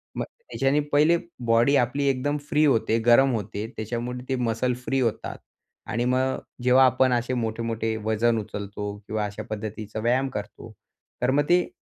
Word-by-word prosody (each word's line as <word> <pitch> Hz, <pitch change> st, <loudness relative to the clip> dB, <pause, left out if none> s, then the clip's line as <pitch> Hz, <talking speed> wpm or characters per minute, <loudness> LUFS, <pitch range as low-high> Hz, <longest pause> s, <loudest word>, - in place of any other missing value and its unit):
मग -, -, -1 dB
त्याच्याने 145 Hz, -, -1 dB
पहिले 155 Hz, +4 st, +5 dB, 0.3 s
बॉडी 115 Hz, +4 st, +4 dB
आपली 140 Hz, +4 st, -1 dB
एकदम 145 Hz, +3 st, 0 dB
फ्री 150 Hz, 0 st, +3 dB
होते, 115 Hz, -5 st, +2 dB
गरम 130 Hz, +2 st, +6 dB
होते. 105 Hz, 0 st, -4 dB
त्याच्यामुळे 120 Hz, +3 st, -4 dB
ते 135 Hz, -, +1 dB
मसल 115 Hz, +3 st, 0 dB
फ्री 135 Hz, 0 st, 0 dB
होतात 115 Hz, -4 st, -2 dB, 0.5 s
आणि 120 Hz, +3 st, 0 dB
मग 130 Hz, +1 st, +1 dB, 0.2 s
जेव्हा 130 Hz, +1 st, +6 dB
आपण 130 Hz, 0 st, +3 dB
असे 120 Hz, +1 st, 0 dB
मोठे, 115 Hz, -2 st, -2 dB
मोठे 115 Hz, -1 st, -2 dB
वजन 115 Hz, +1 st, +2 dB
उचलतो 100 Hz, 0 st, -5 dB
किंवा 110 Hz, -1 st, -1 dB
अशा 105 Hz, 0 st, -6 dB
पद्धतीचा 110 Hz, 0 st, -5 dB
व्यायाम 125 Hz, +4 st, +1 dB
करतो -, -, -7 dB, 0.5 s
तर 125 Hz, +1 st, +2 dB
मग 145 Hz, +2 st, +3 dB
ते 175 Hz, 0 st, +4 dB
120 Hz, 165 wpm, -25 LUFS, 110-130 Hz, 0.5 s, गरम